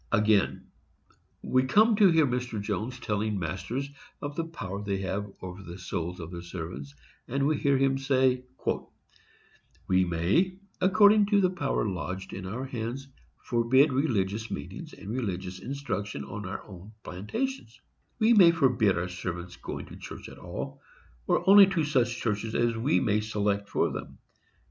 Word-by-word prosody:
Again, 105 -1 +2 0.7
we 130 - +3
come 215 - +5
to 205 -3 +7
hear 160 -2 +5
Mr. 125 -3 -2
Jones 105 +5 -3
telling 105 -2 -1
masters 95 - -3 0.3
of 145 0 -5
the 165 - -1
power 100 - -6
they 100 -1 -1
have 100 +1 -3
over 90 +1 -7
the 85 -1 -9
souls 90 -1 -4
of 85 -1 -7
their 85 -1 -6
servants, 80 -5 -7 0.3
and 135 +2 0
we 155 +2 +3
hear 140 -1 +2
him 135 0 +2
say, 130 -2 +2 1.4
We 95 0 +4
may, 90 - +1 0.3
according 205 +2 +6
to 205 -1 +4
the 185 -2 +3
power 145 -10 -1
lodged 95 0 -4
in 95 -1 -6
our 120 +7 -4
hands, 130 +2 -5 0.3
forbid 130 +4 +3
religious 110 -6 0
meetings - - -7
and - - -11
religious 95 -6 -3
instruction 105 - -4
on 100 +8 -6
our 95 - -5
own 100 +2 -12
plantations; 115 - -4 0.4
we 230 0 +4
may 190 -6 +8
forbid 125 - +3
our 85 +1 -1
servants 90 0 -5
going - - -6
to - - -11
church - - -9
at - - -13
all, - - -6 0.5
or - - +1
only 200 0 +9
to 185 -4 0
such 125 -5 +1
churches 110 0 -2
as 120 -1 +2
we 125 +8 +2
may 105 0 +1
select 105 -2 -1
for - - +1
them. - - -7
115 Hz, 160 wpm, -28 LUFS, 95-140 Hz, 1.4 s, only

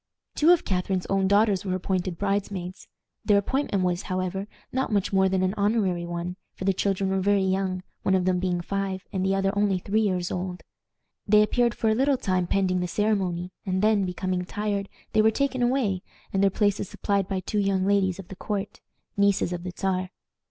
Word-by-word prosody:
Two 310 - +3
of 350 -2 +5
Catharine's 185 0 -1
own 195 -1 +2
daughters 200 -1 +3
were 185 -2 -1
appointed 185 -1 -2
bridesmaids. 195 -2 -3 0.4
Their 205 -2 +4
appointment 200 -2 0
was, 180 -1 0
however, 185 +2 -3 0.3
not 260 -1 -1
much 200 -1 0
more 190 0 +4
than 185 0 +1
an 185 +1 +1
honorary 200 -5 +1
one, 175 +1 -4 0.2
for 190 - -6
the 195 - +3
children 195 0 0
were 190 - +1
very 200 0 +3
young, 190 -1 -1 0.2
one 190 - +2
of 185 -1 +1
them 185 -1 +2
being 180 -1 0
five 195 0 -3
and 190 -1 -1
the 195 0 +2
other 195 +1 0
only 200 -2 +2
three 205 +4 0
years 185 -4 0
old. 180 0 -4 0.6
They 210 +1 +6
appeared 235 +2 +1
for 225 - -1
a - - +4
little 270 +4 +2
time 185 -5 0
pending 185 -1 +1
the 180 - -1
ceremony, 185 -2 0
and 190 0 -1
then, 215 -2 +4
becoming 180 0 -2
tired, 205 +1 -3 0.2
they 215 - +5
were 220 - +5
taken 260 +2 -1
away, 240 -7 +1 0.3
and 195 - +2
their 200 - +5
places 205 0 0
supplied 200 -2 -1
by 190 -1 -1
two 205 +3 -2
young 195 -2 +1
ladies 195 -2 +2
of 195 -3 -10
the 190 - -8
court, 200 +1 -4 0.3
nieces 200 -3 +2
of 175 - -4
the 180 0 -5
Czar. 185 -1 -1
195 Hz, 200 wpm, -26 LUFS, 185-205 Hz, 0.6 s, They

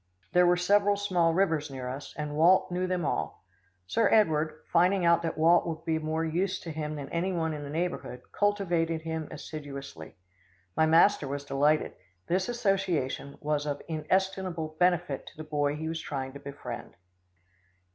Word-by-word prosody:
There 180 0 +5
were 175 0 +4
several 205 +3 +3
small 180 -5 +2
rivers 160 -6 +1
near 130 -2 -6
us, 135 +3 -7
and 150 -1 -4
Walt 175 +4 +4
knew 180 +1 -1
them 180 -3 -1
all. 115 - -3 0.4
Sir 225 - +2
Edward, 155 -7 +2
finding 180 +2 +4
out 170 0 +5
that 165 -1 -3
Walt 170 +2 +4
would 160 -1 -5
be 160 -1 +1
of - - -5
more 160 +1 -1
use 175 +4 -1
to 165 - -6
him 155 0 -4
than 140 -2 -6
any 175 +3 -1
one 160 -3 -1
in 150 - -5
the 140 - -7
neighbourhood, 155 -6 -3
cultivated 175 -6 0
him 160 -1 -3
assiduously. 145 -3 -8 0.6
My 160 - +3
master 165 -1 +5
was 140 +1 -4
delighted. 145 +2 +2 0.3
This 185 +5 0
association 190 - -1
was 150 0 -1
of 145 -1 -2
inestimable 170 0 -1
benefit 175 -5 +1
to - - -12
the 155 - -6
boy 145 -1 0
he 160 +1 -4
was 160 0 -3
trying 135 -2 -4
to 140 - -9
befriend. 140 -4 -8
160 Hz, 175 wpm, -29 LUFS, 150-180 Hz, 0.6 s, There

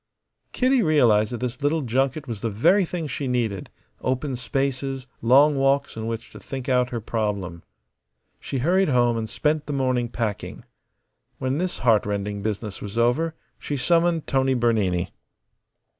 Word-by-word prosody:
Kitty 255 0 +2
realized 120 - +3
that 120 - -5
this 125 +2 -4
little 150 +2 +1
junket 135 +4 0
was 115 -4 -5
the 115 - -1
very 180 - +3
thing 170 -1 -4
she 140 -1 -4
needed 115 -6 -1 0.3
open 130 +1 -1
spaces, 135 +1 -2 0.2
long 140 +6 +5
walks 135 +1 +1
in 110 0 -4
which 115 0 -5
to - - -11
think 130 -2 -7
out 125 -2 +2
her 120 - -3
problem. 100 -6 -3 0.8
She 135 - -4
hurried 180 +7 +2
home 120 -3 +3
and 110 -1 -3
spent 150 +5 0
the 145 - -3
morning 130 -3 0
packing. 115 -4 -4 0.7
When 130 +3 -1
this 180 0 -2
heartrending 105 -2 +1
business 105 -1 -4
was 105 +2 -6
over 130 +8 +2 0.2
she 145 - -3
summoned 165 +3 +2
Tony 135 -1 +1
Bernini. 105 -7 +1
125 Hz, 155 wpm, -24 LUFS, 115-145 Hz, 0.8 s, long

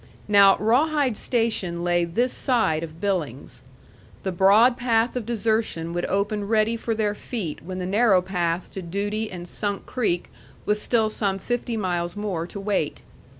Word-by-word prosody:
Now 200 -2 +6
Rawhide 265 +3 +2
station 205 -8 -1
lay 175 0 +2
this 235 +10 0
side 220 -12 +1
of 165 -1 -8
Billings. 170 - -3 0.6
The 190 - -1
broad 205 +7 +5
path 240 -1 +1
of 240 -3 -3
desertion 220 -7 -1
would 175 0 -2
open 200 +1 -1
ready 220 +1 +2
for 230 0 -2
their 210 -1 0
feet 205 -7 -5
when 185 +2 -6
the 180 - -3
narrow 200 0 +4
path 175 -2 -2
to 190 - -6
duty 205 +5 -3
and 175 -1 -8
Sunk 205 +2 -3
Creek 195 -9 -1 0.3
was 210 0 +1
still 220 -2 +1
some 200 -3 -1
fifty 240 +3 -3
miles 175 -3 -2
more 195 -5 -3
to 200 - -8
wait. 200 0 -2
205 Hz, 160 wpm, -24 LUFS, 180-225 Hz, 0.6 s, Now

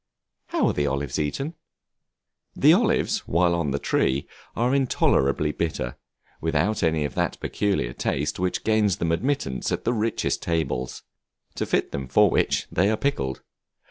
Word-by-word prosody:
How - - +1
are - - +2
the 75 -1 0
Olives 70 +2 -2
eaten? 135 - -2 1.0
The 150 +3 +6
olives 220 +1 +2
while 85 0 +3
on 85 -4 0
the 70 - 0
tree 70 0 0 0.3
are 120 +3 +1
intolerably 75 - +2
bitter, 75 -7 -3 0.5
without 80 +7 0
any 80 -3 +1
of 70 - -4
that - - -1
peculiar 100 -13 -1
taste 75 +5 -2
which 90 0 -1
gains 110 -4 +2
them 85 - 0
admittance 85 - -1
at - - -2
the 120 - +2
richest 115 0 -1
tables; 80 -7 -2 0.5
to - - -3
fit - - 0
them 70 -1 -4
for 65 - +4
which - - +1
they 95 +4 +2
are 110 - +1
pickled. 70 - -2
85 Hz, 155 wpm, -25 LUFS, 70-110 Hz, 1.0 s, The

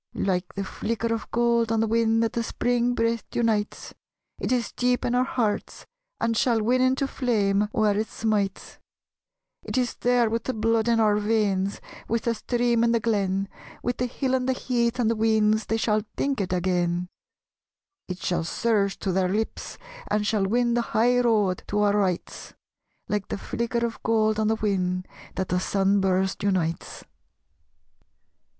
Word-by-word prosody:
Like 180 -2 -1
the 200 - -2
flicker 230 +3 -2
of 225 - -5
gold 235 -1 +2
on 225 - +2
the 225 - +2
whin 225 0 +2
That 225 -1 0
the 235 - 0
Spring 245 +1 0
breath 230 -1 0
unites, 220 -3 -1 0.5
It - - -2
is 245 -2 0
deep 250 0 0
in 240 - 0
our 250 +1 +3
hearts, 235 -5 -2 0.3
and 230 0 0
shall 240 -2 +2
win 245 +4 +2
Into 260 +2 +2
flame 210 -6 +1
where 215 -2 +2
it 215 +1 -1
smites: 210 -3 -2 0.8
It - - -4
is 250 -1 +1
there 245 -1 +2
with 230 +1 -2
the 260 - -2
blood 225 +1 +1
in 230 -1 +3
our 210 -2 +3
veins, 205 -2 0 0.3
With 230 0 -1
the 235 - +1
stream 235 +1 +1
in 235 0 +3
the 230 - +3
glen, 195 -3 0 0.4
With 245 - -1
the 250 - 0
hill 260 +1 -2
and 260 0 +1
the - - +3
heath 240 -2 0
and 240 -3 +1
the 230 - +2
weans 220 0 +2
They 225 - 0
shall 215 -1 +1 0.2
think 275 -5 0
it 185 - -3
again; 180 -1 0 1.0
It 185 - -4
shall 175 -2 -1
surge 200 +2 0
to 195 - -1
their 185 0 +1
lips 215 +3 -3 0.3
and 210 0 +1
shall 205 -3 +1
win 240 +3 +1
The 240 - +2
high 240 +2 +2
road 210 -6 +2
to 205 - -2
our 205 -1 +3
rights 190 -4 -2 0.5
Like 205 -2 -2
the - - -3
flicker 235 +3 -2
of 230 -2 -5
gold 220 -1 +2
on 215 - +1
the 220 - +2
whin 185 -4 -1 0.3
That 190 -1 -2
the 180 - +1
sun 195 +1 +1
burst 190 0 0
unites. 180 -5 -1
220 Hz, 175 wpm, -25 LUFS, 200-235 Hz, 1.0 s, our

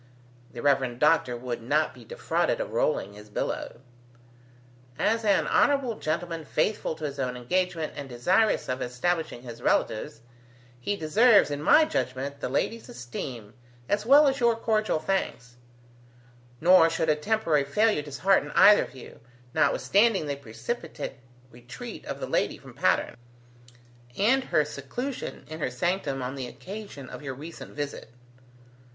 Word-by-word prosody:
The 120 - -8
Rev. 130 -4 +2
Doctor 150 -4 +3
would 120 -1 -5
not 150 +6 +1
be - - -14
defrauded - - -1
of - - -4
rolling - - 0
his 105 +1 -13
billow. 120 - -4 1.2
"As 225 +1 +1
an 200 -3 +3
honourable 275 -5 +2
gentleman 165 +1 -3
faithful 160 +3 -1
to 155 - -11
his 140 -1 -5
own 125 -2 -2
engagement 170 +5 -1
and 140 -2 -7
desirous 185 - +2
of 130 +1 -3
establishing 125 +1 -2
his 120 -2 -9
relatives, 115 +1 0 0.6
he 205 +12 -2
deserves, 200 +2 +4
in 145 0 -3
my 310 - +6
judgement, 140 - -3
the - - -3
lady's 225 - -2
esteem 120 -2 -7 0.3
as 205 0 0
well 285 +6 +7
as 270 0 +1
your 235 -1 +3
cordial 215 -4 0
thanks; 155 -8 -3 1.0
nor 170 -1 +6
should 160 -1 -1
a 155 - +4
temporary 160 -3 +1
failure 210 +6 +2
dishearten 150 +2 +1
either 210 - +7
of - - -15
you, 130 - -12 0.3
notwithstanding 200 +4 +3
the 145 -1 -2
precipitate 140 - -6 0.3
retreat 120 +1 -9
of - - -5
the - - -3
lady - - 0
from - - -14
Patterne, - - +1 1.0
and 255 +6 +3
her - - +2
seclusion 265 +1 -6
in 155 +1 -7
her 150 - -1
sanctum 140 0 -1
on 125 +1 -3
the 130 -2 -5
occasion 195 - -9
of - - -9
your 135 -3 -5
recent 160 +5 -10
visit." 145 -5 -5
155 Hz, 145 wpm, -27 LUFS, 130-210 Hz, 1.2 s, well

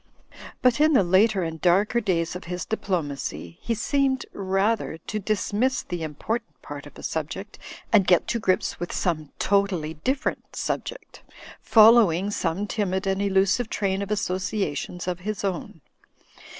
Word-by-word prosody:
But 250 +3 +4
in 310 +1 +5
the 230 - +5
later 190 +2 +3
and 160 -1 -5
darker 200 +6 +3
days 170 -5 0
of 180 - -7
his 180 +1 -4
diplomacy, 145 - -3
he 230 - -1
seemed 265 +3 +1
rather 195 -1 0
to 215 +6 -5
dismiss 215 +5 0
the 175 - -5
impor 160 +9 -2
tant 230 - -40
part 145 0 -8
of 145 - -15
a - - -11
subject, 165 +6 -4 0.3
and 200 -4 +5
get 180 -2 +4
to 235 - 0
grips 185 -4 0
with 175 - -4
some 155 -5 -1
totally 195 -6 +1
different 260 - -2
subject, - - -4 0.4
following 215 -4 +6
some 185 +1 -1
timid 200 -2 -1
and 195 0 0
elusive 200 +4 +2
train 195 -1 -1
of 200 - -4
associations 185 -4 -2
of 180 -1 -2
his 205 +3 -4
own. 180 -4 -4
195 Hz, 150 wpm, -25 LUFS, 175-215 Hz, 0.4 s, following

